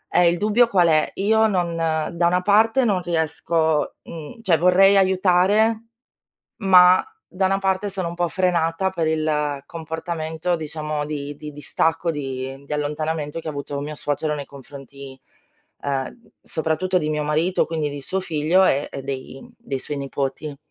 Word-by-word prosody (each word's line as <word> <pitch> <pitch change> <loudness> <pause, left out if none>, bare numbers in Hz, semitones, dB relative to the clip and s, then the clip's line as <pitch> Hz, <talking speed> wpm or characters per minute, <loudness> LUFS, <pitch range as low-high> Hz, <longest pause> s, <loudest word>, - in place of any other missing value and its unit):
E 175 -1 +6
il 170 - 0
dubbio 215 +4 +3
qual 180 -6 +3
è? 155 -1 +3
Io 220 +2 +3
non 175 -4 -1
da 165 +1 0
una 180 +1 +2
parte 225 +5 +4
non 195 -5 +1
riesco 160 -2 0
uhm, 165 +8 -9
cioè 170 -4 +3
vorrei 190 +3 +5
aiutare, 195 +4 +3 0.7
ma 185 -3 +6 0.2
da 190 +1 -1
una 195 +1 +1
parte 195 +1 -1
sono 185 -3 -3
un 170 - -6
po' 175 0 0
frenata 180 0 0
per 165 -4 -1
il 150 -3 -1
comportamento 160 +1 -4
diciamo 155 -1 -4
di 145 -1 -5
di 150 0 -9
distacco, 160 +3 -1
di 135 -1 -5
di 145 - -9
allontanamento 150 +1 -2
che 160 - -7
ha - - -1
avuto 140 0 -5
mio 150 +1 -6
suocero 150 +1 -2
nei 140 - -6
confronti, 140 -1 -12 0.6
ehm, 140 - -4
soprattutto 160 +4 -1
di 155 -2 -2
mio 150 -1 -1
marito, 160 +5 +1
quindi 155 -3 -2
di 145 0 -6
suo 190 +7 -2
figlio 170 +2 +2
e 140 +2 +1
e 135 - -6
dei 135 0 -6 0.2
dei 135 -1 -4
suoi 145 - -5
nipoti. 140 +1 -4
160 Hz, 160 wpm, -22 LUFS, 150-185 Hz, 0.7 s, E